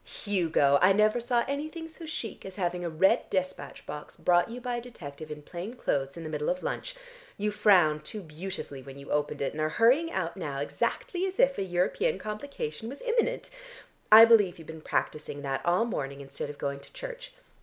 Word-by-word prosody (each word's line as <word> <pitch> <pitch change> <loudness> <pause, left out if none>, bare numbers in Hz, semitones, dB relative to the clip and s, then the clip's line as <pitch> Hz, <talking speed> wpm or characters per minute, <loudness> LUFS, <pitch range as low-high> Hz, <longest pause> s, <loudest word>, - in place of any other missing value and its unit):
Hugo! 160 -8 +3
I 185 +2 +7
never 215 +3 +3
saw 240 0 +1
anything 310 +4 -4
so 325 0 -10
chic 235 -8 -5
as 190 -1 -8
having 180 -2 -1
a 170 - -1
red 170 +4 +3
despatch 185 0 -3
box 150 0 -8
brought 175 +3 +3
you 240 +2 -6
by 245 -1 -2
a - - -4
detective 155 -11 -9
in 150 -1 -7
plain 180 +10 -6
clothes, 140 - -1
in 165 - -6
the 155 - -5
middle 150 -1 -1
of 180 +1 -1
lunch. - - -3 0.4
You 210 +1 0
frowned 185 -8 +4
too 210 -2 -6
beautifully 155 -3 -6
when 135 +1 -11
you 140 - -9
opened 150 -1 0
it, - - 0
and 155 - -4
are 155 - +1
hurrying 255 - +4
out - - -2
now - - -4
exactly 385 -7 -1
as 380 - -6
if 275 -4 +4
a - - +1
European 190 - +1
complication 215 - -5
was 280 - -9
imminent. - - 0 0.6
I 220 +1 +12
believe 210 -6 +5
you've 165 - -11
been 160 0 -9
practising 150 -2 -2
that 135 -1 -2
all 180 +6 +3
morning 140 -11 -3
instead 140 +1 -6
of 145 - -8
going 140 -1 -3
to 140 - -16
church. - - -7
190 Hz, 205 wpm, -29 LUFS, 150-240 Hz, 0.6 s, I